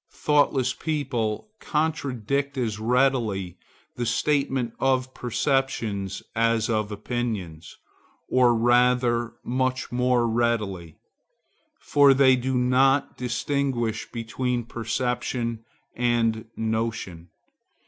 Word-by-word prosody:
Thoughtless 145 -3 +2
people 140 - -2
contradict 140 -3 -1
as 110 -4 -2
readily 115 -7 +1 0.4
the 120 - -1
statement 135 -1 0
of 130 -1 +1
perceptions 115 -6 -1
as 115 0 +2
of 110 -1 -1
opinions, 105 -7 -4 0.5
or 125 -2 +4
rather 120 0 +2
much 130 +1 -1
more 125 -1 +2
readily; 110 -8 -1 0.8
for 140 -2 +5
they 130 -1 +6
do 130 +1 -1
not 130 +3 +3
distinguish 125 -2 -2
between 120 +1 -2
perception 115 0 -3 0.3
and 115 -2 +1
notion. 110 -6 -3
120 Hz, 85 wpm, -25 LUFS, 110-130 Hz, 0.8 s, they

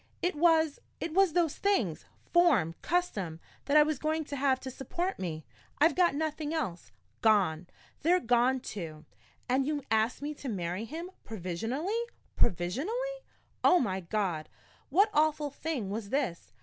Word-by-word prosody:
It 355 - +2
was 320 -1 +3 0.2
it 335 - -3
was 385 -2 +4
those 335 -4 +1
things 235 - 0 0.3
form, 290 - +4
custom 200 - -1 0.3
that 285 +2 +4
I 300 - +9
was 300 -2 -1
going 315 0 -1
to 285 - -5
have 270 -1 +2
to 260 - -6
support 345 +9 -3
me. 160 -4 -4 0.3
I've 320 +3 +5
got 350 -6 +3
nothing 310 0 -2
else. 180 - -3 0.3
Gone 190 -7 +3 0.3
they're 355 +4 +4
gone, 245 -1 +2
too! 160 -9 -7 0.4
And 265 +2 +2
you 295 -2 -1
ask 220 +2 +2
me 290 +2 -4
to 280 -2 -7
marry 185 0 -3
him 330 +8 -6
provisionally 225 - -2 0.3
provisionally! 335 - 0 0.4
Oh, 360 - +6
my 190 -6 0
God! 180 -4 -2 0.4
what 400 +9 +4
awful 300 -1 +2
thing 280 -9 -3
was 210 -1 -4
this? 255 -11 -2
275 Hz, 150 wpm, -30 LUFS, 200-320 Hz, 0.4 s, I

